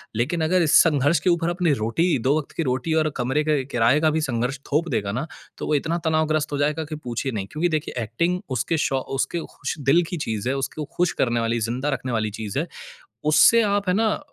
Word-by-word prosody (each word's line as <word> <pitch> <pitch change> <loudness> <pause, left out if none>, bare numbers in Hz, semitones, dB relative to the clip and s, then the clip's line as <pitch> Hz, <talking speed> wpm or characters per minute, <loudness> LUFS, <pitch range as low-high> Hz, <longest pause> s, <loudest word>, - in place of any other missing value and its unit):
लेकिन 140 +10 0
अगर 180 +3 +2
इस 155 -3 +6
संघर्ष 150 0 +2
के 165 - +1
ऊपर 170 -1 +1
अपनी 175 -3 +1
रोटी 160 +11 +1
दो 145 +3 +3
वक़्त 155 - -5
की 165 - +1
रोटी 130 +3 -1
और 155 - 0
कमरे 130 +5 0
के 150 -3 +1
किराए 125 +1 +2
का 160 - +4
भी - - 0
संघर्ष 125 -1 -2
थोप 155 +4 +1
देगा 100 -7 -1
ना, 125 +9 -3 0.3
तो - - -5
वो 150 - +2
इतना 165 +4 0
तनाव 160 0 +2
ग्रस्त 155 -1 0
हो 145 - -1
जाएगा 150 +3 0
कि 155 +1 -6
पूछिए 130 -2 -4
नहीं। 100 -4 -4
क्योंकि 165 +3 0
देखिए, 135 -4 -5
एक्टिंग 170 +12 -1 0.2
उसके 160 +8 0
शौ 135 - 0 0.2
उसके 170 - -1 0.2
खुश - - -4
दिल 145 +6 +3
की 175 - -2
चीज़ 110 -5 -3
है, 135 - 0
उसको 140 +3 -3
खुश 180 -1 +2
करने 120 -1 +1
वाली, 115 0 0
ज़िंदा 120 +6 -2
रखने 130 -2 -3
वाली 110 -2 0
चीज़ 105 +3 -3
है। 165 - -2 0.6
उससे 230 +9 +6
आप 205 -1 0
है - - +3
ना, 220 0 +1
150 Hz, 235 wpm, -23 LUFS, 125-165 Hz, 0.6 s, इस